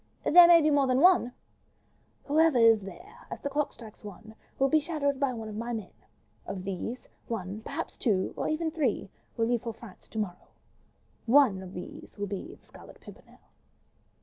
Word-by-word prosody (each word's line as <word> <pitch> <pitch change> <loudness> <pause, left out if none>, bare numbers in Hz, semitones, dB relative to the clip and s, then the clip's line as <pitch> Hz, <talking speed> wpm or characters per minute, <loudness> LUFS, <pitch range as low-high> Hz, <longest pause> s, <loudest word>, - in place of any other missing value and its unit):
"There 350 +2 +8
may 340 -2 +7
be 305 - +3
more 285 -2 +3
than 255 0 +2
one." 355 -6 +5 0.9
"Whoever 310 -1 +3
is 225 -2 +5
there, 190 -3 -12
as - - -6
the 280 - -4
clock 295 +1 -1
strikes 220 -2 -14
one, 210 +2 -11 0.2
will 270 - +3
be 310 +3 +3
shadowed 290 -3 -2
by 280 -2 +1
one 225 -3 -6
of 215 - -7
my 235 +2 -4
men; 220 -3 -6 0.5
of 185 -2 -5
these, 195 +6 -5 0.2
one, 205 -3 -4
or - - -15
perhaps 285 +8 -6
two, 195 -6 0
or - - -3
even 320 +1 -1
three, 275 - -1 0.3
will 225 - +2
leave 240 0 0
for 230 -2 -6
France 225 -4 -14
to 220 - -10
morrow. 185 -5 -4 0.8
One 235 -6 +4
of 185 0 -10
these 180 - -10
will 205 - -2
be 205 - -6
the - - -27
'Scarlet - - -15
Pimpernel. - - -16
235 Hz, 190 wpm, -28 LUFS, 210-290 Hz, 0.9 s, There